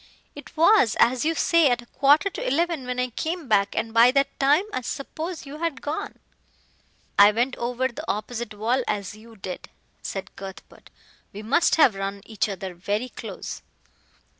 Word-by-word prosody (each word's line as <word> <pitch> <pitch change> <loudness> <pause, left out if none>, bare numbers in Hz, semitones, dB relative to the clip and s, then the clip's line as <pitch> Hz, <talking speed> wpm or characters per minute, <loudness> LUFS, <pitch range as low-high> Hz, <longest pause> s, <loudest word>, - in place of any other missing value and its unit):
It 290 +2 -12
was, 330 - +5
as 250 +3 +3
you 325 +1 +1
say, 335 -4 +4
at 245 -1 0
a - - -18
quarter 290 +9 +3
to - - -5
eleven 320 -1 0
when 250 0 -2
I 250 0 -1
came 320 +4 -4
back, 200 -3 +2
and 225 0 -2
by 230 +2 +7
that 275 +1 0
time 290 +6 +4
I - - -1
suppose 315 +7 -5
you 285 +2 -9
had 330 -4 -3
gone." 295 +2 -4 1.0
"I 205 +1 +9
went 240 +4 0
over 245 +2 -1
the 250 - -8
opposite 220 +1 -5
wall 235 +5 0
as 200 -2 -2
you 225 +1 -15
did," 190 -3 -7 0.3
said 195 0 -6
Cuthbert, 195 -1 -11 0.4
"we 205 +2 -8
must 260 +10 +3
have 305 -8 +5
run 195 0 -4
each 215 -1 -1
other 190 -1 -5
very 205 +7 -3
close." - - -7
245 Hz, 175 wpm, -24 LUFS, 210-290 Hz, 1.0 s, I